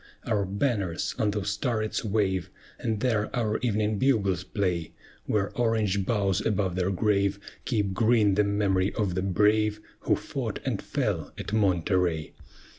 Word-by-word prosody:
Our 105 -4 +1
banners 100 -4 -1
on 105 - +2
those 100 -1 -1
turrets 110 -4 -1
wave, 95 -4 0 0.3
And 110 -3 -2
there 110 -4 +1
our 110 -3 0
evening 105 -3 0
bugles 100 -9 +2
play: 90 -3 -2 0.3
Where 100 -2 0
orange 110 -5 +1
boughs 100 -5 +1
above 100 -4 0
their 90 +1 0
grave 100 0 +1 0.3
Keep 105 -6 0
green 110 -1 +3
the 105 +2 +3
memory 100 -2 +1
of 100 -5 0
the 95 - -1
brave 105 +2 +2 0.2
Who - - +2
fought - - -4
and - - -1
fell - - -2
at - - -6
Monterey. 90 -5 +1
100 Hz, 145 wpm, -27 LUFS, 95-110 Hz, 0.3 s, green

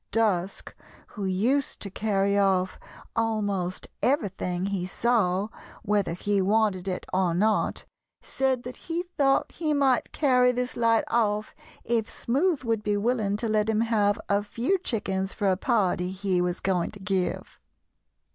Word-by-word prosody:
Dusk, 200 -5 0 0.4
who 205 - -5
used 235 +10 0
to 200 - -6
carry 200 -1 +1
off 190 -2 +2 0.4
almost 205 -5 -1
everything 190 - 0
he 195 -2 -2
saw, 205 -3 +1 0.3
whether 205 -4 +1
he 200 +3 0
wanted 200 -2 +1
it 185 - -3
or 185 -2 +2
not, 215 +4 +1 0.3
said 260 -2 -1
that 250 +1 -7
he 335 +1 -3
thought 280 -6 +1
he 305 -3 -1
might 270 -3 +2
carry 250 -4 +4
this 250 0 -2
light 230 -1 +3
off 215 -2 0 0.3
if 230 -1 0
Smoothe 290 +5 0
would 225 -3 0
be 210 -1 0
willing 210 -2 0
to 230 - -2
let 215 0 +1
him 220 0 +2
have 210 -3 +2
a 200 0 +2
few 235 - -1
chickens 195 - -2
for 200 -2 +1
a - - +2
party 185 -4 +1
he 190 -1 0
was 180 0 -2
going 185 -3 0
to 205 - -10
give. 190 -1 -2
210 Hz, 150 wpm, -26 LUFS, 190-235 Hz, 0.4 s, carry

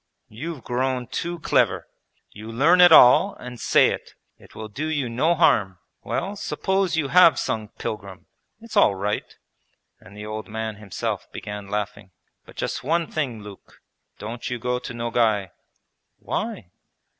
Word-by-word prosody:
'You've 145 +4 -7
grown 125 0 -1
too 170 +8 -4
clever! - - +1 0.4
You 110 +2 -9
learn 160 +10 +4
it 175 -1 +8
all, 125 -6 +7
and 125 -1 -10
say - - +4
it. - - -7 0.2
It - - -18
will 110 - -7
do 140 +9 -4
you 145 -6 -1
no 150 +9 +1
harm. 105 - +3 0.2
Well, 200 - -3
suppose 190 -3 -1
you 145 -4 0
have 180 0 +6
sung 110 -1 -2
"Pilgrim", 100 -3 -6 0.3
it's 230 -1 -11
all 100 - +5
right,' 105 +2 -3 0.6
and 100 +3 -15
the 105 - -7
old 110 0 -6
man 110 -1 -5
himself 105 -3 -5
began 105 -1 -7
laughing. 105 -1 -4 0.4
'But - - -16
just - - -3
one 165 +4 0
thing, 125 -9 -3
Luke, 100 -2 -13 0.4
don't 115 +5 -6
you 125 - -3
go 125 +1 -2
to 125 - -8
Nogay!' 115 -5 0 0.7
'Why?' 90 - -4
120 Hz, 155 wpm, -23 LUFS, 105-155 Hz, 0.7 s, it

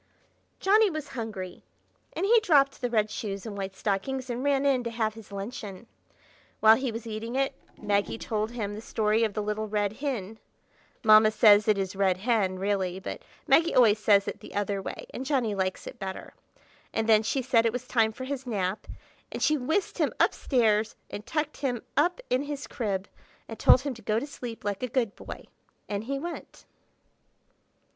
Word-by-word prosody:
Johnny 420 +2 +4
was 310 -4 -5
hungry, 215 -7 -6 0.5
and 360 - -1
he 460 +3 +6
dropped 285 -11 +3
the 245 - 0
red 215 -2 +1
shoes 200 -2 -5
and 215 -3 -6
white 195 -1 -5
stockings 250 +7 -2
and 240 +2 -3
ran 280 -1 +2
in 265 -3 +3
to 235 - -3
have 225 -2 -1
his 220 -2 -13
luncheon. 200 0 -6 0.7
While 220 +1 +7
he 260 -2 -2
was 230 +1 -6
eating 225 +2 -5
it, 270 +1 +1 0.3
Maggie 205 0 0
told 215 -1 -2
him 220 -4 -4
the 210 - -7
story 220 0 +1
of 215 -3 -1
the 210 - -1
Little 210 +1 -2
Rid 205 -1 0
Hin; 225 -7 -3 0.6
(Mamma 215 -1 +7
says 210 -1 +6
it 210 -2 +4
is 195 -1 -2
"Red 190 -2 +2
Hen," 200 -3 +1
really, 190 -2 -1
but - - -6 0.2
Maggie 330 0 +4
always 220 -4 +5
says 200 -2 +4
it - - -4
the - - -12
other 200 -1 -1
way, - - -6
and 260 - -4
Johnny 255 -6 0
likes 190 -1 -2
it - - -9
better); 190 -1 -6 0.6
and 225 0 -1
then 215 -1 +6
she 260 +4 -1
said 230 -2 +3
it - - +1
was 250 +1 -5
time 225 -3 +2
for 255 - -8
his 265 -1 -5
nap, 200 -3 -2 0.4
and - - -3
she 305 - +4
whisked 315 +8 -1
him - - +2
up - - +4
stairs 220 -4 +1 0.2
and 205 - -7
tucked 305 -1 -2
him 250 -5 -2
up 350 - +2
in 255 +1 +3
his 290 0 -5
crib 200 -5 -3 0.4
and 225 - -8
told 255 - +6
him 280 -1 -3
to 230 - -13
go 215 +1 0
to 280 - -5
sleep 245 -5 -8
like 205 -1 -2
a 250 - -1
good 235 -4 -1
boy, - - -9 0.4
and 205 +1 -3
he 275 +3 -2
went. 340 +5 -8
225 Hz, 195 wpm, -27 LUFS, 205-260 Hz, 0.7 s, While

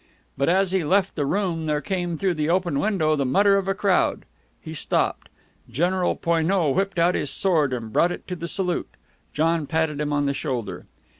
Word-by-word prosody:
But 140 +3 +1
as 190 +1 +2
he 190 -2 +1
left 190 +5 +2
the 145 -3 -2
room 175 -3 -1
there 150 -1 +1
came 175 -1 -3
through 190 +2 +1
the 155 -1 -1
open 175 -5 +1
window 170 -7 +1
the 140 - 0
mutter 195 +10 +4
of 195 -1 -2
a 195 - 0
crowd. 195 -1 +1 0.3
He 160 - -9
stopped. 155 - -1 0.4
General 175 +8 0
Poineau 165 -1 +1
whipped 195 +5 -1
out 170 +2 +3
his 145 - -2
sword, 160 -5 +1
and 115 -3 -5
brought 175 - +3
it - - -7
to 180 - -3
the 170 -1 -6
salute. 180 -1 -1 0.4
John 160 0 0
patted 160 -2 -1
him 150 0 -2
on 145 0 +1
the 140 - 0
shoulder. 115 -10 -4
170 Hz, 200 wpm, -23 LUFS, 150-185 Hz, 0.4 s, mutter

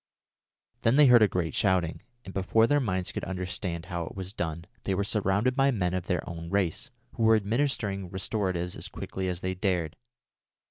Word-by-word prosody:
Then 115 +3 +3
they 150 0 +7
heard 125 -3 +7
a 105 - +7
great 90 -4 -2
shouting, 90 -4 +1 0.2
and 95 - -8
before 100 +4 +3
their 145 +5 +3
minds 95 -8 -1
could - - -5
understand 90 -2 -3
how 85 -2 -3
it - - -9
was 95 0 -5
done, 85 -2 -3 0.2
they 95 - -1
were 100 - 0
surrounded 105 +4 +1
by 135 0 +4
men 90 -8 0
of 90 -1 -3
their 90 -3 -1
own 85 -1 -6
race, 100 - 0 0.2
who - - -6
were 110 0 +6
administering 105 -4 -1
restoratives 95 -2 -2
as - - -5
quickly 95 0 -5
as 90 -1 -3
they 95 0 -1
dared. 90 -4 -1
95 Hz, 190 wpm, -28 LUFS, 90-110 Hz, 0.2 s, they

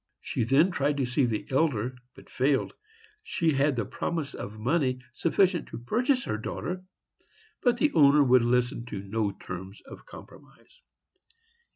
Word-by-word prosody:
She - - -2
then 145 +9 +4
tried 145 -3 0
to 135 - +1
see 130 +2 +1
the 110 -3 -2
elder, 130 -4 +1 0.2
but - - -15
failed. 135 +1 0 0.5
She 165 - 0
had 140 +1 +2
the 115 -4 -1
promise 155 - -3
of 105 +2 -7
money 130 +3 +1 0.2
sufficient 175 +4 +1
to - - -8
purchase 245 - 0
her 110 - -2
daughter, 180 +11 -5 0.8
but 245 -2 +2
the 295 +4 +2
owner 145 -1 +6
would 130 -1 +5
listen 120 0 +1
to 100 -5 -6
no 105 +1 -1
terms 95 +1 -8
of - - -13
compromise. - - -15
135 Hz, 155 wpm, -27 LUFS, 120-165 Hz, 0.8 s, owner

